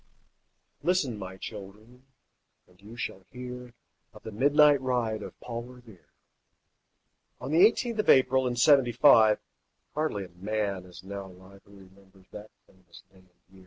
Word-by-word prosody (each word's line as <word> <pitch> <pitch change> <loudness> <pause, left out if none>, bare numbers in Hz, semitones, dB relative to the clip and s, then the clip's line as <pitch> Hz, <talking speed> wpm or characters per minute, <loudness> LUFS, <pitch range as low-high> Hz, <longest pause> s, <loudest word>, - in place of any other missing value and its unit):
Listen, 170 -10 0
my 95 -1 -8
children, 110 +6 -11 0.6
and 90 +1 -25
you 110 +4 -13
shall 95 -5 -6
hear 125 -1 -9 0.4
Of - - -14
the 110 - -8
midnight 145 +4 +4
ride 120 -4 -1
of - - -10
Paul 120 -1 -6
Revere, 120 -6 -15 1.3
On 130 - -6
the 165 +4 +5
eighteenth 230 +1 +2
of 215 - 0
April, 130 0 +4
in 120 - -2
Seventy 125 -1 +4
five; 110 -4 +6 0.6
Hardly 150 -10 -2
a - - -15
man 100 +1 -4
is 90 0 -14
now 100 0 -7
alive 95 +1 -16
Who 100 - -18
remembers 95 0 -20
that 105 +1 -10 0.2
famous 90 -2 -19
day 95 - -23
and 95 0 -25 0.2
year. 95 - -18
110 Hz, 155 wpm, -27 LUFS, 95-130 Hz, 1.3 s, five